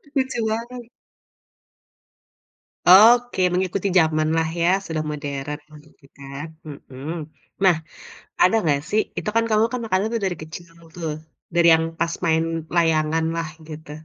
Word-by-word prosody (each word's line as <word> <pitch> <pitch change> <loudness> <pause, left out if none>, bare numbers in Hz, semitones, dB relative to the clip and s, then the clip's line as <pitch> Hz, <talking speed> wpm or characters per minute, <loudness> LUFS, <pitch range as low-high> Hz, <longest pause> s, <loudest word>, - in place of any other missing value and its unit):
Lucu 265 -2 0
banget. 230 +2 -4 2.0
Oke. 230 +4 +7
Mengikuti 185 +2 -1
jamanlah, 160 0 +2
ya? 170 - +3 0.2
Sudah 155 -1 -2
modern, 145 -1 -5
begitu 150 -1 -18
kan 140 +3 -7 0.2
mhm. 140 0 -8 0.5
Nah, 185 -3 +5 0.7
ada 185 +5 +5
enggak 145 -5 +1
sih 215 +2 +2 0.2
itu - - -2
kan 230 - +4
kamu 215 +1 +3
kan 250 - -2
makanan 195 -1 0
tuh 230 - -1
dari 185 -2 -1
kecil 160 +2 -10 0.3
tuh, 165 -3 -4 0.4
dari 170 0 +5
yang 160 0 +3 0.2
pas 170 0 0
main 160 -1 +2 0.3
layanganlah 160 0 +1 0.2
gitu. 155 -1 -10
165 Hz, 130 wpm, -22 LUFS, 155-200 Hz, 2.0 s, Oke